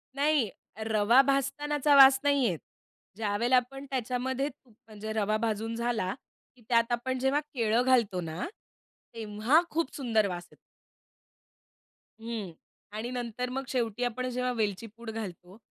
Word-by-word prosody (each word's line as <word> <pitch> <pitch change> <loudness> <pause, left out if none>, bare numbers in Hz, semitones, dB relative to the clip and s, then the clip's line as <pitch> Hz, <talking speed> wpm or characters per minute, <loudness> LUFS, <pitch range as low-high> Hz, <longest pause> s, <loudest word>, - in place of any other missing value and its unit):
नाही 285 -6 +2 0.4
रवा 220 +4 +5
भाजतानाचा 280 +2 +1
वास 270 -1 +9
नाही 285 -1 +3
येत. 175 -8 0 0.6
ज्यावेळेला 225 +3 +1
आपण 270 +3 0
त्याच्यामध्ये 260 +1 -1
तूप 255 -5 -21
म्हणजे 215 0 -6
रवा 215 0 +1
भाजून 225 0 -2
झाला 230 -5 -1 0.4
की 245 - -22
त्यात 230 -1 +3
आपण 255 +2 -1
जेव्हा 265 +3 +2
केळं 230 -2 +2
घालतो 230 -8 +3
ना 160 +1 -4 0.7
तेव्हा 225 +7 +2
खूप 330 -3 -2
सुंदर 225 -6 +1
वास 175 -1 -5
येतो. - - -18 1.7
हं. 225 -5 -5 0.5
आणि 235 +3 -3
नंतर 245 0 -3
मग 270 +1 -3
शेवटी 240 -3 -1
आपण 245 +1 -1
जेव्हा 250 0 -1
वेलची 220 -1 -2
पूड 235 -1 -8
घालतो, 190 -3 -7
235 Hz, 140 wpm, -29 LUFS, 215-260 Hz, 1.7 s, वास